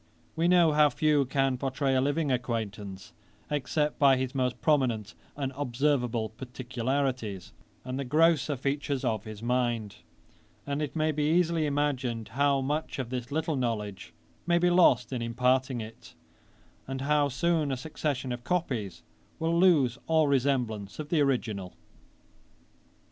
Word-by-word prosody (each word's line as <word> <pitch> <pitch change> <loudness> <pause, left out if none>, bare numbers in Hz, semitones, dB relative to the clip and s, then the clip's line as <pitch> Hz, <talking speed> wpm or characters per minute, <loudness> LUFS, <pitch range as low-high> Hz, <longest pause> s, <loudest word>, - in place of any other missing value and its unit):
We 165 +1 +1
know 175 -3 +5
how 150 0 +5
few 150 -2 +2
can 135 -1 0
pourtray 135 0 0
a 130 - +3
living 145 +1 0
acquaintance, 105 -6 -4 0.4
except 150 +1 -1
by 135 -2 +6
his 130 0 -2
most 125 -2 -1
prominent 120 -9 +1 0.2
and 135 -2 -3
observable 125 -4 0
particularities, 125 -3 -3 0.3
and 130 +1 -4
the - - -1
grosser 150 0 +3
features 140 +1 -2
of 110 -3 -1
his 110 0 -8
mind; 120 -4 -1 0.7
and 140 +1 -2
it 150 0 -4
may 155 0 +1
be 150 0 -1
easily 165 -2 +2
imagined 135 -6 -1
how 140 +1 +2
much 150 +4 -2
of 130 -3 -4
this 125 0 -4
little 160 +1 -1
knowledge 110 -6 -3 0.4
may 170 0 +4
be 175 +1 +3
lost 130 -9 +4
in 125 - -2
imparting 125 +2 +1
it, 115 +1 -11 0.7
and 135 0 -4
how 145 0 +2
soon 155 +2 0
a 130 - -1
succession 135 -2 -3
of 120 0 -5
copies 115 - -2 0.3
will 165 +1 0
lose 150 -9 +4
all 160 -2 +3
resemblance 125 -7 0
of 150 -1 -6
the 160 -3 +2
original.' 110 -9 -1
135 Hz, 145 wpm, -28 LUFS, 120-150 Hz, 0.7 s, by